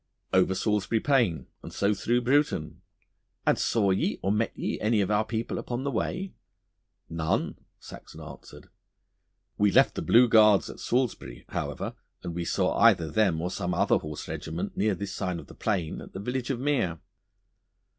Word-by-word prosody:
'Over 95 0 +3
Salisbury 105 +1 0
Plain 110 - +1 0.2
and - - -9
so 100 +1 +1
through 120 +5 0
Bruton.' 120 - 0 0.6
'And - - +3
saw 100 -4 +2
ye 95 - 0
or 95 - +1
met 110 +2 +1
ye - - -3
any 110 0 +2
of 100 0 0
our 105 +1 +3
people 115 +1 -3
upon 120 +1 -4
the 140 - -1
way?' 180 - -3 0.7
'None,' 80 -1 -2 0.2
Saxon - - -12
answered. - - -12 0.9
'We 105 -1 +3
left 135 +1 +5
the - - -4
Blue 120 +2 +5
Guards 110 -3 +5
at - - -13
Salisbury, 120 - -2
however, - - -4 0.3
and 85 -2 -4
we 85 0 -3
saw - - 0
either 95 -8 +4
them 95 -6 +2
or 90 +2 -2
some 90 0 -2
other - - +3
horse 75 -1 -7
regiment 80 +2 -5
near 105 0 +1
this 100 +2 -5
side 90 -3 -2
of - - -9
the - - -14
Plain 95 -8 -2
at - - -12
the 95 - -6
village 125 +5 -3
of 130 -3 -1
Mere. 130 - 0
105 Hz, 175 wpm, -27 LUFS, 90-120 Hz, 0.9 s, left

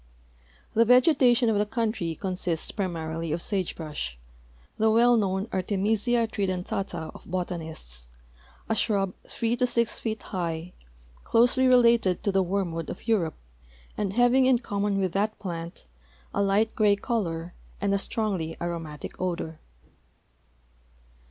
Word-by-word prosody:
The 230 - +5
vegetation 250 0 +5
of 215 -2 +2
the 210 - +2
country 215 -8 -1
consists 180 -2 -1
primarily 165 -4 -3
of 165 - -1
sage 190 0 -2
brush, 150 - -5 0.6
the 220 +1 +4
well 240 +2 +5
known 195 -2 0
Artemisia 215 +5 +1
tridentata 185 -4 -3
of - - -14
botanists, 160 - -5 0.6
a - - +1
shrub 200 -4 +1
three 230 0 -1
to 250 0 +2
six 235 -1 +1
feet 220 -1 -3
high, 170 -2 -4 0.5
closely 245 +3 +4
related 235 -7 +4
to 200 - +1
the 195 0 +3
wormwood 175 -3 -2
of - - -8
Europe, 185 -9 +1 0.6
and 200 -2 -2
having 245 +3 +4
in 260 -2 +5
common 205 -3 -1
with 190 -2 0
that 210 +4 0
plant 170 - -6 0.5
a 200 - +1
light 200 +3 +2
gray 210 -2 +4
color 175 -6 -2 0.3
and 200 0 +1
a 200 - +2
strongly 195 -7 -2
aromatic 165 -3 -5
odor. 170 -3 -3
195 Hz, 130 wpm, -27 LUFS, 170-225 Hz, 0.6 s, The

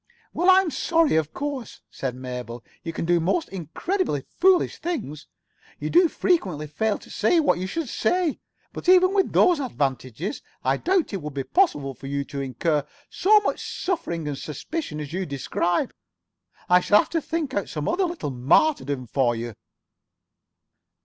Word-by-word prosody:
"Well, 355 +3 +2
I'm 375 -2 +5
sorry, 330 - +2
of 160 -1 +1
course," 280 -4 -5
said 130 -2 -4
Mabel. 125 -2 -6 0.2
"You 165 - -4
can 165 - -4
do 175 0 +3
most 250 - 0
incredibly 190 - -2
foolish 370 0 +2
things. 155 - -4 0.5
You - - -3
do 350 0 +6
frequently 190 - 0
fail 205 +9 -1
to - - -16
say 220 +12 +3
what 295 - +2
you 185 - -3
should 325 - -3
say. 330 +8 0 0.3
But - - -3
even 370 +1 +6
with 390 -2 +2
those 355 -4 +4
advantages, 140 - -3 0.2
I - - +2
doubt 370 -2 +1
if - - -11
it 195 - -3
would 150 -1 -7
be 135 - -1
possible 145 - +1
for 135 - -10
you 140 0 -1
to 140 0 -6
incur 145 +3 0 0.3
so 420 +3 +5
much 415 - -2 0.2
suffering 175 - -2
and 140 -2 -3
suspicion 155 - -5
as 150 0 -6
you 185 0 -2
describe. 170 - -1 0.7
I 180 0 +6
shall 205 +3 +4
have - - +1
to 330 - 0
think 310 -3 -3
out 200 - -2
some 150 -2 -4
other 380 +1 +1
little 340 - -4
martyrdom 140 - +2
for 120 0 +1
you." 115 0 -5
185 Hz, 170 wpm, -24 LUFS, -, 0.7 s, do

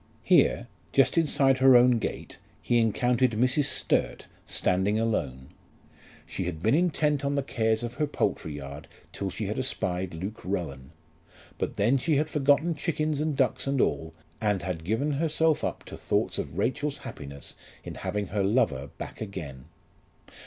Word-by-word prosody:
Here, - - +3 0.3
just 135 - +4
inside 140 -5 +3
her 130 -1 +7
own 120 -1 +6
gate, - - -5 0.2
he 120 - +2
encountered 120 +2 +2
Mrs. 130 +6 +2
Sturt - - 0 0.2
standing 95 +4 +1
alone. 70 - -2 0.8
She 95 - -4
had 85 -2 -5
been 110 - +3
intent 150 -3 +2
on 140 0 0
the 140 - 0
cares 110 -3 0
of 120 0 -4
her 150 - +2
poultry 80 - -2
yard 70 0 -8 0.3
till - - -3
she - - -4
had - - -2
espied 90 -1 -2
Luke 95 +7 -6
Rowan; 75 -8 -4 0.7
but - - -2
then 120 +7 +2
she 155 +4 +1
had 155 +2 0
forgotten 150 +4 +3
chickens 155 -1 -1
and 155 -2 -1
ducks 130 +1 +1
and 135 -1 0
all, 80 -1 0 0.3
and 105 -4 0
had 85 -3 -4
given 115 - 0
herself 160 +1 +1
up - - -3
to - - -9
thoughts - - -1
of - - -5
Rachel's 145 +3 -1
happiness 70 -1 -8 0.3
in - - -7
having 105 -3 -3
her 100 0 -1
lover 90 - +1
back - - -8
again. 75 -11 -7
115 Hz, 160 wpm, -27 LUFS, 90-140 Hz, 0.8 s, her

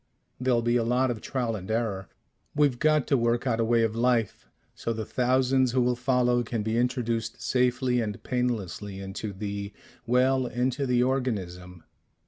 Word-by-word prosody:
There'll 125 -2 +1
be 120 +1 +2
a 115 - +1
lot 125 +2 +1
of 115 - -5
trial 120 -4 -2
and 95 -1 -8
error. 110 -4 -2 0.5
We've 145 -5 +2
got 155 -2 +3
to 140 - +2
work 120 +1 +1
out 115 -3 0
a - - +3
way 115 0 +3
of 110 -1 0
life, 115 -3 0 0.3
so 115 - -3
the 110 -1 -4
thousands 130 0 +2
who 130 - +3
will 125 0 +1
follow 125 -1 +2
can 115 -2 -3
be 110 +1 -1
introduced 115 -2 -1
safely 125 0 +1
and 105 -3 -4
painlessly 105 -5 -2
into 95 +2 -5
the 100 0 -5 0.4
well, 130 +1 +3
into 130 +3 -1
the 125 -1 +3
organism. 95 -9 -3
120 Hz, 170 wpm, -27 LUFS, 110-125 Hz, 0.5 s, got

